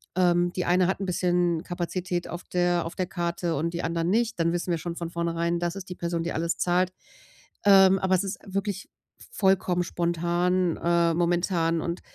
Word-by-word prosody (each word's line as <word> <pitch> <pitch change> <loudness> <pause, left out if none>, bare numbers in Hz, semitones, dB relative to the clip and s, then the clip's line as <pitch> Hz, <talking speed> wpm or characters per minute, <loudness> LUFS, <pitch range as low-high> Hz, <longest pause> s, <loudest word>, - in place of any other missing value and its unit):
ähm, 175 -1 +3
die 180 - -2
eine 180 +1 +3
hat 190 - -1
'n 195 - -3
bisschen 175 -2 +1
Kapazität 175 0 -3
auf 175 - -7
der 175 -1 +1
auf 165 - -6
der 185 - -1
Karte 170 -1 -2
und 170 +4 -2
die 170 - -3
anderen 165 +1 -1
nicht, 225 -1 +1
dann 170 +1 +2
wissen 175 0 -2
wir 165 - 0
schon 170 0 -5
von 170 -1 -5
vornherein, 170 0 -1
das 175 +1 -2
ist 195 -1 -8
die 180 - -6
Person, 170 -1 -2
die 170 - -3
alles 165 +1 -1
zahlt, 180 +1 +1 0.7
ähm, 195 -1 +7
aber 190 0 +2
es 185 - +1
ist 195 - -4
wirklich 195 0 -3 0.4
vollkommen 190 - +2
spontan, 175 +1 0
ähm, 170 -1 +2
momentan 170 -1 +1
und 170 +1 -4
175 Hz, 195 wpm, -26 LUFS, 170-185 Hz, 0.7 s, ähm